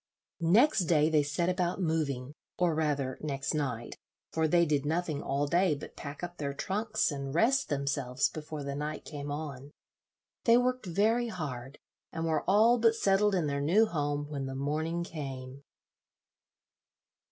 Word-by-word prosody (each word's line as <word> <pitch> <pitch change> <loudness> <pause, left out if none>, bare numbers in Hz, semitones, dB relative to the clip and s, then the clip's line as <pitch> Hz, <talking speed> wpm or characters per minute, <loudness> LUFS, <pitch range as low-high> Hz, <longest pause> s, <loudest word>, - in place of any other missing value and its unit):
Next 195 - +4
day 155 -1 +3
they 155 -2 +4
set 145 +4 -1
about 180 0 0
moving, 150 -6 -1 0.2
or 175 -2 +2
rather 145 -4 -1
next 140 -1 -2
night, 130 -6 -3 0.3
for 160 0 +2
they 170 +2 +4
did 145 -3 +1
nothing 155 -1 -1
all 140 +1 0
day 170 +1 +2
but 145 - -10
pack 145 +3 -8
up 175 0 -5
their 140 -1 -3
trunks 215 +4 0
and 140 0 -5
rest 265 +9 +3
themselves 140 -2 0
before 150 -1 -6
the 140 0 -3
night 150 +2 -4
came 145 -1 -6
on. 145 -2 -5 0.8
They 235 0 +7
worked 250 -3 0
very 220 +7 +2
hard, 140 - -6 0.3
and 165 0 -3
were 160 -2 +1
all 225 +5 +5
but 225 0 +4
settled 200 -1 +3
in 175 -4 +1
their 140 -1 -1
new 185 +10 +4
home 145 -5 -2
when 140 -3 -4
the 135 - -5
morning 155 +5 -1
came. 135 -5 -7
155 Hz, 160 wpm, -30 LUFS, 140-180 Hz, 0.8 s, They